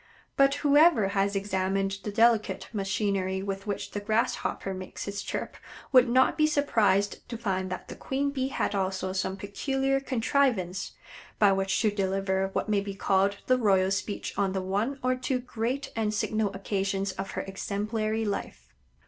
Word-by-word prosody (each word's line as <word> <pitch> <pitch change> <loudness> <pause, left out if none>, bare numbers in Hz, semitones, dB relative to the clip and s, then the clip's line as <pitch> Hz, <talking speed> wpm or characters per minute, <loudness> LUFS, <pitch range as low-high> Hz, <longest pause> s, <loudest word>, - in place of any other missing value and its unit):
But 275 0 +4
whoever 290 - +5
has 200 0 0
examined 195 0 -1
the 210 - -4
delicate 215 -3 +2
machinery 195 -2 -1
with 195 0 -4
which 200 - -3
the 205 - -3
Grass 215 +3 +1
hopper 195 - -3
makes 185 0 -7
his 200 0 -4
chirp - - -4 0.3
would 255 -2 +6
not 260 +5 +3
be 305 - +5
surprised 220 -9 +1
to 235 - -4
find 190 -4 -2
that 185 - -6
the - - -8
queen 280 +1 -1
Bee 265 -2 -1
had 270 - -1
also 190 -1 -1
some 190 0 -2
peculiar 270 +7 -1
contrivance 230 -8 0 0.4
by 205 -2 +5
which 195 0 +1
to 215 - +3
deliver 195 -1 0
what - - -1
may 210 -2 +2
be 200 -1 -6
called 195 0 +1
the 255 0 +3
royal 190 -4 +3
speech 195 +1 -3
on 195 -1 +1
the 190 - -1
one 205 +9 -1
or 255 0 +3
two 255 +1 -1
great 250 +2 -3
and 215 -2 0
signal 215 -1 0
occasions 195 0 -1
of 195 +1 -5
her - - +1
exemplary 215 +3 -2
life. 200 -1 -5
200 Hz, 170 wpm, -28 LUFS, 195-235 Hz, 0.4 s, would